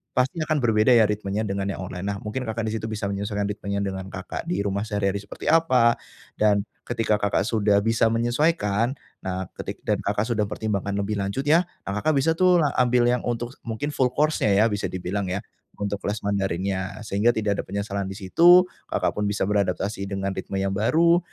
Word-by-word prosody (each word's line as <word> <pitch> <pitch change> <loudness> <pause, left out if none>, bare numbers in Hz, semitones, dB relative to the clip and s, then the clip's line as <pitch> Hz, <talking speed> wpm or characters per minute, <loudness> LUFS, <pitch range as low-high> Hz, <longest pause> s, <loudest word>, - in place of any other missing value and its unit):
pasti 135 +6 +1
akan 155 0 +1
berbeda 110 0 +3
ya 115 -2 +6
ritmenya 105 0 -2
dengan 100 -1 -2
yang 100 - -3
online, 90 -1 -6
nah 100 0 -2
mungkin 105 +6 -4
Kakak 110 0 -2
di 110 - -2
situ 110 0 -3
bisa 105 -2 -3
menyesuaikan 100 +1 -2
ritmenya 100 0 -3
dengan 95 -1 -4
Kakak - - -6
di 100 +3 -1
rumah 100 0 -1
sehari-hari 100 -1 -1
seperti 100 - -10
apa, 130 -8 +4 0.5
dan, 105 -1 +3 0.2
ketika 115 -3 0
Kakak 100 -1 +1
sudah 105 -2 +2
bisa 115 0 +3
menyesuaikan, 120 -1 +1 0.3
nah 95 0 -3
ketik - - -6
dan - - +1
Kakak 105 - 0
sudah 110 -3 0
pertimbangkan 100 -2 -2
lebih 100 +1 -1
lanjut 100 +8 -2
ya, 160 +4 +5 0.2
ah 100 - -3
Kakak 155 -1 +2
bisa 150 +4 +3
tuh 180 +1 +4
la 145 - +2
ambil 125 0 +3
yang 125 - 0
untuk 120 +1 -2
mungkin 115 +6 -3
full 130 -1 +2
course 150 +1 +1
-nya 100 -2 +3
ya, 105 +3 +5
bisa 105 0 -1
dibilang 95 +2 -3
ya, 95 - -1 0.4
untuk 100 0 -2
kelas 105 +1 -3
Mandarinnya, 95 0 -2
sehingga 105 +3 +2
tidak 105 -2 0
ada - - -1
penyesalan 100 0 -3
di 95 - -6
situ, 170 - +6 0.3
Kakak - - 0
pun 105 - +1
bisa 105 - -1
beradaptasi 100 0 -1
dengan 95 0 -2
ritme 95 +1 -4
yang 95 - 0
baru, 165 - +4
105 Hz, 200 wpm, -24 LUFS, 100-120 Hz, 0.5 s, ya